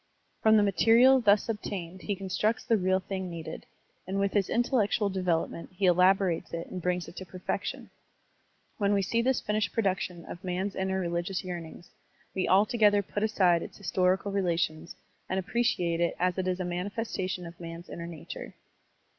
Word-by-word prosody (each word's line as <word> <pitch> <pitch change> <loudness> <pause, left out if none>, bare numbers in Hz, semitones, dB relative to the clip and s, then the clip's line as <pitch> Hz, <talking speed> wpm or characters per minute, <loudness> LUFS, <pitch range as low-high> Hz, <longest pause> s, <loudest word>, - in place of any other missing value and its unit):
From 220 0 +6
the 210 - +5
material 230 +6 +5
thus 205 -2 +4
obtained 190 -5 -5
he 205 - -2
constructs 195 +5 -1
the 230 - +3
real 185 -2 +2
thing 190 -1 -4
needed, 165 -2 -7 0.4
and 195 +1 -1
with 200 0 +1
his 200 -3 +1
intellectual 230 -3 +1
development 180 -3 -1
he 190 +1 0
elabo 185 +2 +5
rates 170 -1 -2
it 170 - -4
and 185 - -5
brings 180 0 -1
it 170 - -11
to - - -5
perfection. 185 0 -4 0.9
When 200 -1 +2
we 200 -1 +2
see 230 +5 +1
this 260 +2 +1
finished 210 -2 -1
production 185 -5 -1
of 175 - -9
man's 185 +2 -2
inner 190 -1 -1
rel^ious 175 +2 -2
yearnings, 175 -1 -7 0.4
we 190 - -1
altogether 205 +1 +4
put 205 - -4
aside 185 -6 +3
its - - -8
historical 190 0 +1
relations 170 -4 -1 0.3
and 190 - 0
appreciate 180 -5 0
it 170 - +1
as 180 0 +1
it 185 - -1
is 185 0 -1
as - - -2
a - - -2
manifes 195 +6 -3
tation 185 -1 -3
of 170 0 -12
man's 170 0 -8
inner 170 0 -7
nature. 165 -3 -8
190 Hz, 180 wpm, -29 LUFS, 175-205 Hz, 0.9 s, From